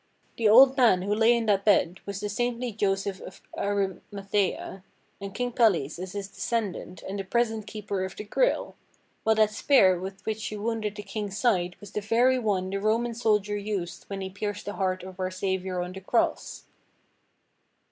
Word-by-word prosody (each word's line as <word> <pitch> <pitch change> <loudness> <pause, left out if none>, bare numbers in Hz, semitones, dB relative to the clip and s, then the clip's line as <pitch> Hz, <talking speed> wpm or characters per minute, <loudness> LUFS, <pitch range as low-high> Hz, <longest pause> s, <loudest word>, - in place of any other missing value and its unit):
"The 225 -2 +3
old 265 +5 +8
man 220 -8 +5
who 200 +2 0
lay 225 +2 +4
in 230 - -1
that 200 -2 +2
bed 190 -3 +3
was 200 0 -4
the 210 - -2
saintly 240 +3 -2
Joseph 195 -2 -1
of - - -10
Ari 200 -2 -1
mathaea, 195 -1 -2 0.4
and 200 0 -7
King 245 +1 -1
Pelles 180 - +2
is 185 0 -6
his 200 -1 -4
descendant 200 -4 -3
and 195 +1 -5
the - - -2
])resent 225 -3 0
keeper 205 -3 -4
of 190 - -5
the - - -6
Grail; - - 0 0.5
while 220 0 +3
that 215 -1 +4
spear 190 -8 +4
with 190 +1 -8
which 220 0 -3
you 210 - -5
wounded 215 -1 -2
the 205 - -7
King's 205 -2 -5
side 180 -8 +1
was 205 -2 -11
the 210 - -3
very 245 +5 +3
one 190 -5 -1
the 195 - -1
Roman 230 +3 +1
soldier 210 -3 +1
used 200 -4 -4
when 195 -1 -6
he 190 0 -5
pierced 205 +1 -4
the 205 - -4
heart 185 -2 -1
of 185 0 -10
our 185 0 -1
Saviour 185 -1 -2
on 180 - -6
the 190 - -8
cross." 230 +5 -1
205 Hz, 190 wpm, -27 LUFS, 190-220 Hz, 0.5 s, old